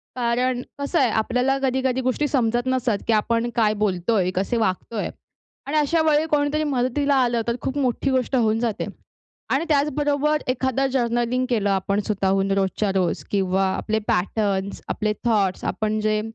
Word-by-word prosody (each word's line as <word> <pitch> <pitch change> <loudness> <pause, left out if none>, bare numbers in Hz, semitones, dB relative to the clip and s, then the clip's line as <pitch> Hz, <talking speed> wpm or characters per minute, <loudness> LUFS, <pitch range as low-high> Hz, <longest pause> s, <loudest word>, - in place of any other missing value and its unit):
कारण 245 +1 0 0.2
कसं 280 +4 0
आहे, 255 -4 +3
आपल्याला 250 +5 +1
कधी-कधी 260 0 +1
गोष्टी 255 +4 0
समजत 240 -2 0
नसतात, 255 -4 +1
की 230 - +3
आपण 230 +2 +1
काय 220 -3 +3
बोलतोय, 190 0 +1
कसे 195 +6 0
वागतोय. 215 +1 -1 0.6
आणि 300 +2 -1
अशा 305 +2 +2
वेळी 300 +1 +3
कोणीतरी 295 +1 +1
मदतीला 280 0 +1
आलं, 240 -1 +1
तर 235 - +1
खूप 265 +2 -3
मोठी 265 0 0
गोष्ट 260 0 0
होऊन 225 -2 +2
जाते. 230 -3 -1 0.6
आणि 285 +5 +1
त्याचबरोबर 295 0 +1
एखादं 260 +1 0
जर्नलिंग 240 0 0
केलं 210 -4 +1
आपण 195 +1 0
स्वतःहून 195 -2 +1
रोजच्या 195 +1 0
रोज 185 -2 0
किंवा 190 -1 +1
आपले 220 0 -1
पॅटर्न्स, 195 +1 -1
आपले 210 0 -1
थॉट्स, 200 -5 +1
आपण 215 0 -1
जे, 215 0 +1
235 Hz, 155 wpm, -23 LUFS, 210-265 Hz, 0.6 s, आहे